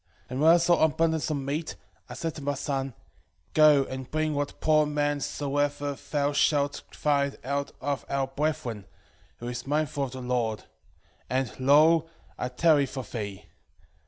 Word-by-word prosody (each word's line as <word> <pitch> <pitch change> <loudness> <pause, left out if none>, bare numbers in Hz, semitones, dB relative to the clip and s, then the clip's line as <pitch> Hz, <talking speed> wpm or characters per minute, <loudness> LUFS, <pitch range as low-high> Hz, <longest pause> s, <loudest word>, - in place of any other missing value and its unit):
2:2 - - -17
And 130 +2 -2
when 160 +2 +7
I - - +6
saw 170 0 +3
abundance 160 0 +1
of 155 - 0
meat, 140 +4 -3 0.3
I - - -7
said 165 -1 -3
to - - -9
my 140 0 -1
son, 135 -2 -3 0.6
Go 150 -3 +6
and 130 -1 -7
bring 155 0 0
what 145 0 -3
poor 155 -1 +3
man 145 0 0
soever 145 0 -1 0.2
thou 145 0 +1
shalt 145 0 +2
find 140 -2 0
out 140 +2 -2
of 140 -4 -2
our 140 -1 0
brethren, 135 -6 -3 0.5
who 120 - -7
is 125 +2 -5
mindful 145 -1 0
of 130 - -9
the 130 - -6
Lord; 120 -3 -1 0.7
and, 130 -3 -1
lo, 155 +5 +5 0.3
I 125 - -3
tarry 145 +2 +3
for 130 -1 -5
thee. 105 -4 -6
145 Hz, 165 wpm, -27 LUFS, 130-155 Hz, 0.7 s, when